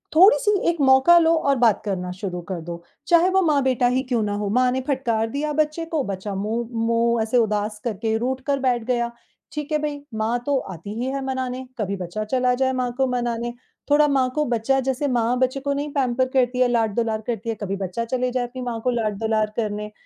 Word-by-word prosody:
थोड़ी-सी 415 Hz, +6 st, +6 dB, 0.2 s
एक 340 Hz, -1 st, -1 dB
मौका 265 Hz, +5 st, +6 dB
लो 330 Hz, 0 st, +4 dB, 0.2 s
और 275 Hz, -, +4 dB
बात 230 Hz, -4 st, +3 dB
करना 180 Hz, -3 st, -2 dB
शुरू 180 Hz, -1 st, -5 dB
कर 180 Hz, -3 st, -3 dB
दो, 170 Hz, +1 st, -7 dB, 0.2 s
चाहे 345 Hz, +1 st, +5 dB
वो 380 Hz, 0 st, +3 dB
माँ-बेटा 265 Hz, -7 st, +2 dB
ही 250 Hz, +1 st, +1 dB
क्यों 245 Hz, -3 st, 0 dB
ना 205 Hz, -1 st, -1 dB
हो? 205 Hz, 0 st, -2 dB
माँ 250 Hz, +4 st, +3 dB
ने 260 Hz, +1 st, -1 dB
फटकार 235 Hz, -6 st, 0 dB
दिया 290 Hz, +5 st, -2 dB
बच्चे 310 Hz, +2 st, 0 dB
को, 320 Hz, -3 st, -1 dB
बच्चा 200 Hz, -1 st, -4 dB
मुँह 220 Hz, +4 st, -2 dB, 0.2 s
मुँह 230 Hz, 0 st, +2 dB
ऐसे 225 Hz, +3 st, +1 dB
उदास 210 Hz, -2 st, 0 dB
करके 220 Hz, -1 st, -1 dB
रूठ 255 Hz, +3 st, -2 dB
कर 280 Hz, -1 st, +1 dB
बैठ 250 Hz, -3 st, +1 dB
गया। 240 Hz, 0 st, -1 dB, 0.4 s
ठीक 300 Hz, 0 st, -5 dB
है 305 Hz, -, +3 dB
भई, 295 Hz, -1 st, -3 dB
माँ 220 Hz, +2 st, 0 dB
तो 285 Hz, -1 st, +2 dB, 0.2 s
आती 180 Hz, +5 st, -8 dB
ही 245 Hz, -, -1 dB
है 275 Hz, 0 st, -3 dB
मनाने, 260 Hz, -1 st, -3 dB
कभी 200 Hz, -2 st, -1 dB
बच्चा 185 Hz, +4 st, -4 dB
चला 250 Hz, +3 st, +1 dB
जाए 260 Hz, +1 st, +1 dB
माँ 250 Hz, -1 st, -1 dB
को 265 Hz, -1 st, +2 dB
मनाने, 240 Hz, -1 st, -2 dB, 0.4 s
थोड़ा 295 Hz, +1 st, +5 dB
माँ 265 Hz, -3 st, +2 dB
को 300 Hz, 0 st, +1 dB
बच्चा 245 Hz, +2 st, +1 dB
जैसे 265 Hz, +2 st, -1 dB
माँ 245 Hz, -1 st, +1 dB
बच्चे 260 Hz, +1 st, +1 dB
को 280 Hz, +1 st, -1 dB
नहीं 285 Hz, +1 st, -3 dB
पैम्पर 260 Hz, -2 st, +1 dB
करती 250 Hz, -1 st, +2 dB
है, 255 Hz, -, +5 dB
लाड-दुलार 225 Hz, -1 st, 0 dB
करती 230 Hz, -1 st, -3 dB
है, 225 Hz, -, -1 dB
कभी 195 Hz, -1 st, -2 dB
बच्चा 195 Hz, +4 st, -3 dB
चले 250 Hz, +1 st, -1 dB
जाए 250 Hz, 0 st, 0 dB
अपनी 255 Hz, +1 st, -8 dB
माँ 240 Hz, -2 st, -3 dB
को 255 Hz, -, +1 dB
लाड-दुलार 220 Hz, -1 st, 0 dB
करने, 210 Hz, -2 st, -3 dB
245 Hz, 220 wpm, -23 LUFS, 220-270 Hz, 0.4 s, थोड़ी-सी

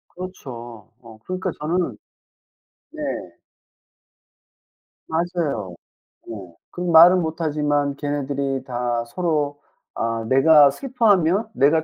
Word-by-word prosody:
그렇죠. 120 Hz, -, -9 dB
어 115 Hz, -2 st, -14 dB
그러니까 185 Hz, 0 st, -3 dB
저는 170 Hz, +4 st, -1 dB, 0.9 s
네. 310 Hz, -1 st, -9 dB, 2.1 s
맞아요. 160 Hz, -, -2 dB, 0.5 s
네. 115 Hz, -, -6 dB, 0.4 s
그 180 Hz, -, -7 dB
말은 175 Hz, +1 st, +7 dB
못하지만 150 Hz, -3 st, -1 dB
걔네들이 140 Hz, -2 st, -3 dB
다 120 Hz, -1 st, -2 dB
서로 145 Hz, 0 st, -2 dB, 0.3 s
아 115 Hz, 0 st, -2 dB
내가 145 Hz, +2 st, +6 dB
슬퍼하면 215 Hz, -, +1 dB
내가 155 Hz, +4 st, +3 dB
150 Hz, 195 characters per minute, -22 LUFS, 130-175 Hz, 2.1 s, 말은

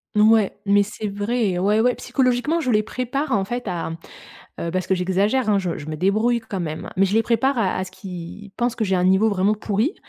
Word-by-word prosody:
Ouais 215 Hz, -1 st, +4 dB
mais 205 Hz, 0 st, +4 dB
c'est 210 Hz, +1 st, -4 dB
vrai. 205 Hz, -1 st, -1 dB
Ouais, 205 Hz, +4 st, +2 dB
ouais. 245 Hz, +2 st, +3 dB
Psychologiquement, 260 Hz, +5 st, 0 dB
je 260 Hz, -6 st, 0 dB
les 215 Hz, -1 st, +4 dB
prépare, 255 Hz, +6 st, -3 dB
en 200 Hz, -2 st, +1 dB
fait, 240 Hz, +1 st, -4 dB
à, 175 Hz, -3 st, -3 dB, 0.7 s
heu, 170 Hz, -, -2 dB
parce 185 Hz, +1 st, -2 dB
que 190 Hz, -, +2 dB
j'exagère, 195 Hz, +7 st, +1 dB
hein. 205 Hz, -, +3 dB
Je 180 Hz, -3 st, -3 dB
je 150 Hz, -, -8 dB
me 155 Hz, -, -4 dB
débrouille 215 Hz, +7 st, +1 dB
quand 205 Hz, -4 st, -5 dB
même. 155 Hz, -2 st, -5 dB
Mais 195 Hz, +1 st, +4 dB
je 195 Hz, -, -2 dB
les 225 Hz, -, +4 dB
prépare 250 Hz, +4 st, +1 dB
à 200 Hz, -5 st, +1 dB
à 185 Hz, -, -1 dB
ce 190 Hz, -, -11 dB
qu'ils 190 Hz, +1 st, -9 dB
pensent 240 Hz, +1 st, 0 dB
que 220 Hz, -, 0 dB
j'ai 190 Hz, -2 st, +1 dB
un 180 Hz, -, +1 dB
niveau 190 Hz, +4 st, +4 dB
vraiment 200 Hz, +2 st, +2 dB
pourri 215 Hz, -, -1 dB
205 Hz, 230 wpm, -22 LUFS, 190-235 Hz, 0.7 s, Ouais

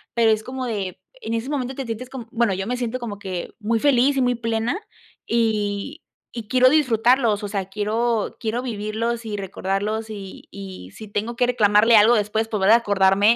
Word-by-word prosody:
Pero 230 Hz, -2 st, +4 dB
es 215 Hz, 0 st, 0 dB
como 255 Hz, 0 st, -5 dB
de 200 Hz, -6 st, -4 dB, 0.2 s
en 230 Hz, -, -3 dB
ese 230 Hz, +4 st, -3 dB
momento 265 Hz, -2 st, -2 dB
te 270 Hz, -, -4 dB
sientes 230 Hz, +2 st, -5 dB
como 255 Hz, -4 st, -8 dB
bueno, 230 Hz, -4 st, +1 dB
yo 190 Hz, +1 st, -3 dB
me 245 Hz, +3 st, -2 dB
siento 245 Hz, 0 st, -2 dB
como 210 Hz, -4 st, -6 dB
que 185 Hz, -4 st, -5 dB
muy 225 Hz, +1 st, 0 dB
feliz 275 Hz, +1 st, +3 dB
y -, -, +3 dB
muy 245 Hz, 0 st, +2 dB
plena 230 Hz, -, -1 dB, 0.5 s
y 220 Hz, +5 st, -1 dB, 0.3 s
y 230 Hz, -3 st, -6 dB
quiero 255 Hz, +2 st, +5 dB
disfrutarlos, 240 Hz, -5 st, +3 dB
o -, -, -2 dB
sea, 200 Hz, -2 st, -3 dB
quiero 215 Hz, +2 st, -1 dB
quiero 230 Hz, +2 st, -2 dB
vivirlos 230 Hz, 0 st, -3 dB
y 210 Hz, -2 st, -4 dB
recordarlos 200 Hz, +3 st, -3 dB
y 200 Hz, -3 st, -9 dB
y 190 Hz, -, -9 dB
si 215 Hz, -, -9 dB
tengo 210 Hz, +3 st, -3 dB
que 245 Hz, -, +2 dB
reclamarle 225 Hz, -1 st, +4 dB
algo 220 Hz, +3 st, +7 dB
después, 220 Hz, +1 st, 0 dB
volver 205 Hz, -1 st, +2 dB
a 230 Hz, -, +8 dB
acordarme 205 Hz, 0 st, +3 dB
225 Hz, 195 wpm, -22 LUFS, 205-240 Hz, 0.5 s, a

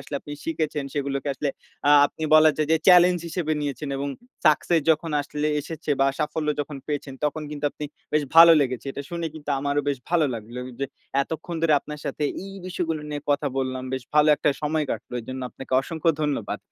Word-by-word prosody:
আসলে -, -, -8 dB
আপনি 145 Hz, -, -9 dB
শিখেছেন, 155 Hz, -3 st, -2 dB
সেগুলোকে 140 Hz, 0 st, -2 dB
আসলে 145 Hz, +1 st, -2 dB, 0.4 s
আ -, -, +6 dB, 0.2 s
আপনি 160 Hz, -, -11 dB
বলা 155 Hz, 0 st, +8 dB
যায় 155 Hz, -, 0 dB
যে -, -, +6 dB
চ্যালেঞ্জ 180 Hz, 0 st, +7 dB
হিসেবে 165 Hz, -2 st, -2 dB
নিয়েছেন 145 Hz, 0 st, -3 dB
এবং 140 Hz, +1 st, -2 dB, 0.4 s
সাকসেস 160 Hz, +2 st, +4 dB
যখন 160 Hz, +1 st, +1 dB
আসলে 150 Hz, +1 st, -3 dB
এসেছে 155 Hz, +1 st, -6 dB
বা, 135 Hz, -, +5 dB
সাফল্য 150 Hz, 0 st, -2 dB
যখন 145 Hz, 0 st, -5 dB
পেয়েছেন, 145 Hz, -2 st, -4 dB
তখন 150 Hz, +1 st, -1 dB
কিন্তু 150 Hz, -1 st, -6 dB
আপনি 150 Hz, -, -7 dB, 0.3 s
বেশ 150 Hz, -1 st, +3 dB
ভালো 165 Hz, 0 st, +11 dB
লেগেছ। 130 Hz, -3 st, -1 dB
এটা 140 Hz, -, -6 dB
শুনে 170 Hz, -1 st, -3 dB
কিন্তু 150 Hz, -2 st, -7 dB
আমারও 145 Hz, +1 st, 0 dB
বেশ 140 Hz, -3 st, 0 dB
ভালো 170 Hz, -3 st, +3 dB
লাগলো 115 Hz, +3 st, -7 dB
ও -, -, -7 dB
যে 140 Hz, -, 0 dB, 0.4 s
এতক্ষণ 160 Hz, +3 st, -6 dB
ধরে 160 Hz, -2 st, +4 dB
আপনার 150 Hz, 0 st, -8 dB
সাথে -, -, -4 dB, 0.2 s
এই 195 Hz, -, -9 dB
বিষয়গুলো 165 Hz, -4 st, -2 dB
নিয়ে 145 Hz, -1 st, -3 dB
কথা 145 Hz, 0 st, +1 dB
বললাম। 130 Hz, -1 st, -2 dB
বেশ 130 Hz, -1 st, -2 dB
ভালো 150 Hz, 0 st, +5 dB
একটা 150 Hz, -, +2 dB
সময় 155 Hz, 0 st, 0 dB
কাটলো। -, -, -5 dB
এজন্য 130 Hz, +3 st, -6 dB
আপনাকে 130 Hz, +1 st, -10 dB
অসংখ্য 165 Hz, +3 st, 0 dB
ধন্যবাদ। 140 Hz, -8 st, -2 dB
150 Hz, 195 wpm, -24 LUFS, 140-160 Hz, 0.4 s, ভালো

